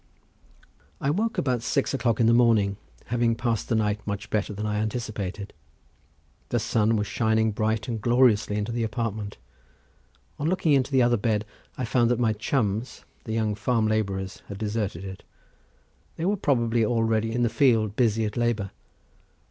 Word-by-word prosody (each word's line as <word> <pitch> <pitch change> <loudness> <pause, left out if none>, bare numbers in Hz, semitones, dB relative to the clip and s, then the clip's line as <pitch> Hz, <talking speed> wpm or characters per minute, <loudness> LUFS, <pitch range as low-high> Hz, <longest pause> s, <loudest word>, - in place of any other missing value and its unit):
I 140 - 0
awoke 220 +9 0
about 125 -4 0
six 140 +4 0
o'clock 120 -5 0
in 115 - +4
the 115 - +5
morning, 110 -5 +3 0.4
having 120 -1 +2
passed 115 -2 -2
the 115 - +2
night 105 -1 +1
much 100 +1 -4
better 105 -1 0
than 105 +1 -4
I 105 0 -1
anticipated. 105 -3 -4 1.0
The - - +1
sun 110 0 +1
was 105 -1 0
shining 110 0 +1
bright 110 0 -1
and 115 -3 -3
gloriously 120 -3 +3
into 105 +2 -2
the 120 0 -2
apartment. 110 -2 -3 1.0
On 150 +3 0
looking 170 -4 +2
into 135 0 +2
the 130 -2 +4
other 120 0 +3
bed 105 0 0 0.3
I 130 - -2
found 120 -1 +2
that 120 - +2
my 115 -2 +2
chums, 110 0 -2 0.2
the 110 - -4
young 110 -2 0
farm 110 +2 0
labourers, 100 -3 -2
had 100 - -7
deserted 105 -3 -3
it. 95 -1 -8 0.9
They 165 - -3
were 200 +3 +2
probably 120 - +1
already 115 -1 +1
in 120 +1 0
the - - +4
field 115 -5 +2
busy 115 -2 +2
at 105 - -4
labour. 120 -5 0
110 Hz, 170 wpm, -26 LUFS, 105-120 Hz, 1.0 s, the